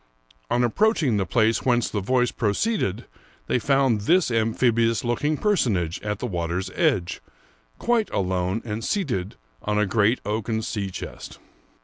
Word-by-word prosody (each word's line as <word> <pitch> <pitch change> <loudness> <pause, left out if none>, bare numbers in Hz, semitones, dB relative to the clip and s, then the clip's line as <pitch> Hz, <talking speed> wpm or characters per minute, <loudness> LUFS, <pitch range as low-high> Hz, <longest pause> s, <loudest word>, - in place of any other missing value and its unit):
On 120 - +2
approach 210 - +2
ing 120 -7 +2
the 95 -3 -1
place 110 +3 +2
whence 120 -2 +2
the 105 - -2
voice 125 +4 +1
proceeded, 105 - -1 0.4
they - - +1
found 135 -4 +2
this 170 - +3
amphibious 115 0 +2
looking 145 +6 0
personage 110 - 0
at 105 0 -3
the - - -4
water's 90 -2 -3
edge, 90 -1 0 0.6
quite 235 -3 +1
alone, 95 +2 -1
and 110 0 -4
seated 115 - -2 0.3
on 105 0 -1
a 105 - +3
great 110 +4 +2
oaken 110 +1 -2
sea 105 -4 -3
chest. 90 - -8
115 Hz, 145 wpm, -24 LUFS, 100-125 Hz, 0.6 s, this